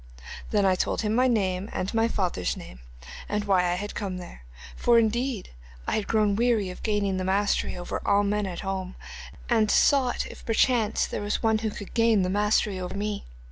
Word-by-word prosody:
Then 205 -2 +2
I 190 - +4
told 185 - -1
him 215 -1 0
my 250 +3 +3
name 195 -4 0
and 185 - -3
my 225 0 +3
father's 180 - -1
name, - - -11 0.5
and 210 0 -1
why 180 -3 +3
I 190 +4 -2
came 195 -3 -4
there, 60 - -11 0.3
for 240 -1 +3
indeed 230 0 0 0.3
I - - -2
had 215 - -1
grown 210 -2 +2
weary 225 -4 +1
of 180 - -11
gaining 205 -3 0
the 185 - -2
mastery 195 0 0
over 175 - -4
all 200 0 +3
men 205 0 0
at 175 -2 -5
home, 190 -1 -4 0.5
and 220 -3 +2
sought 265 -4 +3
if - - -11
perchance 225 -1 +2
there - - -4
was 205 0 -2
one 220 -1 +3
who 220 0 -1
could 205 -1 -9
gain 230 -4 +3
the 180 - -1
mastery 205 -1 +1
over 180 +1 -5
me. 210 0 -3
205 Hz, 195 wpm, -26 LUFS, 190-225 Hz, 0.5 s, I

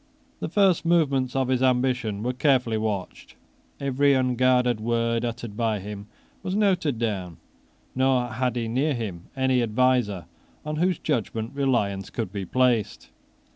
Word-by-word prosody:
The - - -4
first 195 -4 +3
movements 140 -7 +1
of 135 -1 +1
his 130 -1 +1
ambition 125 -5 +1
were 125 +1 -1
carefully 125 -4 +2
watched: 105 -4 -4 0.4
every 140 0 +2
unguarded 125 -2 +2
word 115 +1 0
uttered 115 -2 -5
by 110 -2 0
him 100 +1 -8 0.3
was 185 - -3
noted 185 - +1
down; 95 -7 -3 0.6
nor 130 -1 +2
had 125 +1 -1
he 115 -2 -2
near 135 +6 0
him 100 -8 -5
any 130 -1 +2
adviser 115 -4 +1 0.4
on 150 0 -3
whose 180 +1 +1
judgment 110 0 -2
reliance 120 -9 0
could 90 - -4
be 100 -2 -4
placed. 125 0 0
125 Hz, 140 wpm, -25 LUFS, 110-130 Hz, 0.6 s, first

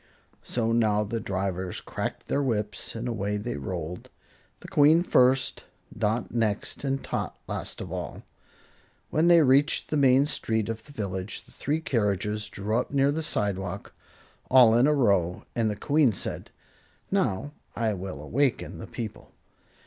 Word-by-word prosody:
So 115 -2 -1
now 110 -2 +3
the 115 +2 -3
drivers 95 -2 -3
cracked - - -5
their 140 - +1
whips 105 -6 -2
and 115 +2 -4
away 105 -3 -1
they 105 - -4
rolled, 85 +3 -5 0.5
the - - -10
Queen 155 +4 +5
first, 130 -5 +3 0.3
Dot 110 +2 -1
next 110 0 -1
and 135 -1 -1
Tot - - -3
last - - -5
of - - -7
all. - - -5 0.9
When 160 +2 +3
they 170 -2 +7
reached 140 +2 +3
the 155 - +2
main 135 0 +5
street 110 -7 -1
of 115 0 -4
the - - -13
village, 100 -6 -4
the - - -21
three 150 +3 -2
carriages 105 - -1
drew 105 +4 -1
up - - -3
near 140 0 +3
the 160 +2 -2
sidewalk, 100 - -3 0.6
all 125 -4 +7
in 120 +4 +5
a 150 - +3
row, 100 - +2
and 115 -2 +1
the 105 - -2
Queen 145 +4 +3
said: - - -4 0.6
"Now 115 +10 0 0.2
I 115 -2 0
will 95 -6 -6
awaken 135 - 0
the - - -7
people." 110 -3 -7
115 Hz, 155 wpm, -27 LUFS, 100-135 Hz, 0.9 s, they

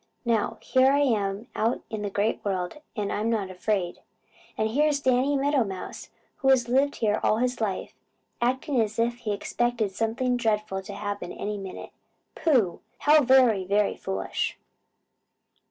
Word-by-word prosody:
Now, 230 -3 +1
here 260 +1 +4
I 285 +1 +3
am 210 -5 0
out 225 +3 0
in 215 -2 -3
the 205 - -2
Great 205 +3 -1
World, 185 +2 -2 0.2
and 205 -3 -2
I'm 215 +2 -1
not 205 -5 -1
afraid. 185 -1 -2 0.6
And 220 0 0
here's 295 +3 +2
Danny 260 +1 +2
Meadow 280 -1 +2
Mouse, 190 -3 -7 0.3
who 270 - +1
has 255 -3 +4
lived 270 +4 +2
here 210 -2 +1
all 215 - +2
his 250 0 -1
life, 200 -4 -2 0.5
acting 255 +1 +1
as 215 -1 -2
if 235 +1 +1
he 220 -3 -3
expected 230 0 -1
something 230 +5 0
dreadful 215 -4 0
to 200 +1 -8
happen 205 -3 -4
any 210 0 -4
minute. 190 -1 -8 0.4
Pooh! 245 - +2 0.2
How 300 +1 +6
very, 255 -7 +5
very 200 +2 +1
foolish!" 95 0 -3
225 Hz, 155 wpm, -26 LUFS, 205-255 Hz, 0.6 s, How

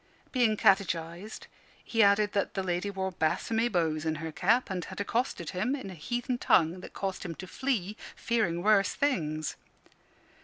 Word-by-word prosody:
Being 235 -5 +2
catechised, 190 -1 +1 0.4
he 225 - +1
added 205 0 +4
that 200 - -1
the 190 - -1
lady 180 +2 -1
wore 190 -1 -3
bassomy 225 +8 0
bows 160 -4 0
in 160 -1 0
her 160 +1 -5
cap, 215 +8 +2
and 180 -2 -2
had - - -8
accosted 205 - -1
him 215 +10 0
in 255 -9 -7
a - - -7
heathen 240 - -3
tongue 170 -4 +3
that - - -10
caused 195 -1 -3
him 170 -3 -5
to 185 - -8
flee, 215 -2 -2 0.2
fearing 180 -7 0
worse 200 -2 +4
things. 155 - -1
195 Hz, 165 wpm, -29 LUFS, 170-225 Hz, 0.4 s, added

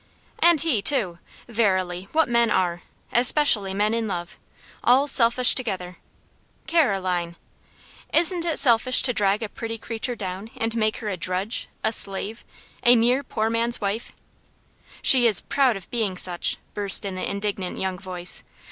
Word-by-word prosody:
"And 340 -3 +4
he, 305 -11 0
too! 200 -8 +1 0.3
Verily, 185 -5 -1
what 320 -1 +2
men 235 -1 +1
are! 175 -2 -1 0.3
Especially 240 -5 +4
men 210 +3 0
in 230 -1 -2
love. 175 -3 -6 0.4
All 260 +4 +3
selfish 250 -2 +3
together." 185 -8 -5 0.7
"Caroline!" 185 - 0 0.8
"Isn't 345 0 +4
it 330 -3 -1
selfish 250 0 +4
to 250 - 0
drag 205 0 0
a 215 - -5
pretty 225 +1 -6
creature 230 +2 -4
down, 195 0 -7
and 225 0 -1
make 215 -1 0
her 220 - -7
a 190 - -4
drudge, 185 +6 -3
a 220 - +1
slave 205 +3 -3 0.4
a 240 +1 +6
mere 245 +3 +2
poor 220 -5 -3
man's 235 +1 +1
wife?" 205 +2 -4 0.9
"She 250 -3 +7
is 210 -6 +6
proud 265 -6 0
of 185 - -11
being 215 -6 -2
such!" 175 -1 -1 0.2
burst 200 -1 +4
in 195 - -4
the 185 - -4
indignant 200 -2 -4
young 190 -1 -4
voice. 180 -2 -4
220 Hz, 155 wpm, -23 LUFS, 190-245 Hz, 0.9 s, She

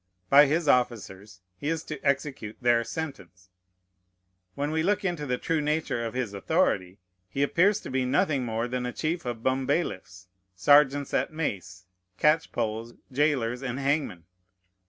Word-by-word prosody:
By 145 +1 +8
his 155 +2 0
officers 105 -7 0 0.2
he 145 - -4
is 165 -1 -2
to 150 -3 -7
execute 140 -6 -1
their 120 -1 +3
sentence. 95 - -7 1.1
When 145 +1 -2
we 160 0 0
look 195 +3 0
into 170 -5 -2
the 125 -1 0
true 160 +3 -1
nature 150 -5 -1
of 115 +1 -5
his 125 -5 -2
authority, 95 -1 0 0.3
he 135 +8 -1
appears 190 +8 +3
to - - -8
be 130 0 +1
nothing 140 +1 +1
more 115 0 -2
than 125 0 -3
a 125 - -5
chief 165 0 -2
of 120 -2 -4
bumbailiffs, 130 - -1 0.3
sergeants 145 +6 +4
at - - 0
mace, 95 - -4 0.3
catchpoles, 120 -7 0 0.2
jailers, 130 -4 +1
and 130 -2 -3
hangmen. 140 - -1
130 Hz, 150 wpm, -27 LUFS, 115-150 Hz, 1.1 s, By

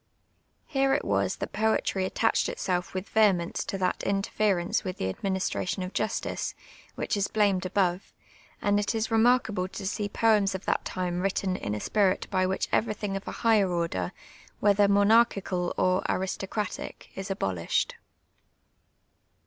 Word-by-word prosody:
Here 270 -2 +2
it 285 - -2
wa>i - - +2
that - - -5
jxH'tr}' 215 -3 +1
attached 225 +4 +1
it.self 180 0 -2
with 185 +1 -4
vehemence 195 -6 +2
to 195 - -3
that 185 -1 0
inter 195 0 -1
ference 190 -5 +1
with 185 - -4
the 95 - -1
administration 190 - -2
of 185 - -6
ju.stice, 215 - -2 0.4
which - - -1
is 200 -1 0
blamed 200 -4 +1
above; 185 -1 0 0.5
and 205 0 +3
it 205 +2 -1
is 225 0 -1
remarkable 225 -4 +3
to 195 +1 -7
see 205 +1 -2
poems 210 -3 +3
of 190 - -6
that - - 0
time 180 -1 -2
written 190 -1 0
in 105 - -3
a - - -3
spirit 195 - +1
by 185 -1 +2
which 190 - -1
ever^thini^ 210 -2 0
of 195 - -6
a - - -3
higher 215 -4 +5
order, 165 - -1 0.5
whether 205 0 +4
monarchicid 200 -3 +3
or 185 0 +2
aristocratic, 190 +2 -3
is 195 0 -6
abolished. 95 - -1
195 Hz, 150 wpm, -27 LUFS, 185-210 Hz, 0.5 s, higher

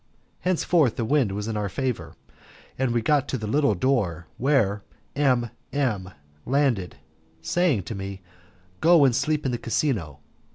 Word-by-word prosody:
Henceforth 170 -7 +2
the 115 - -2
wind 130 -4 +2
was 105 +2 -4
in 110 - -3
our 105 -1 -1
favour, 130 +3 -3 0.6
and 130 -1 0
we 120 0 +1
soon - - -11
got 145 +1 +2
to 130 - -2
the 110 - -5
little 140 +1 +2
door, 90 -7 0
where 115 -7 +2 0.3
M 125 -5 +2 0.2
M 115 -10 -1 0.3
landed, 125 - 0 0.5
saying 150 - +1
to 85 - -6
me, 95 -1 -6 0.6
"Go 165 -3 +6
and 125 -3 +3
sleep 150 +2 0
in 130 - +1
the 120 - -2
casino." 110 - -1
125 Hz, 160 wpm, -25 LUFS, 105-140 Hz, 0.6 s, Go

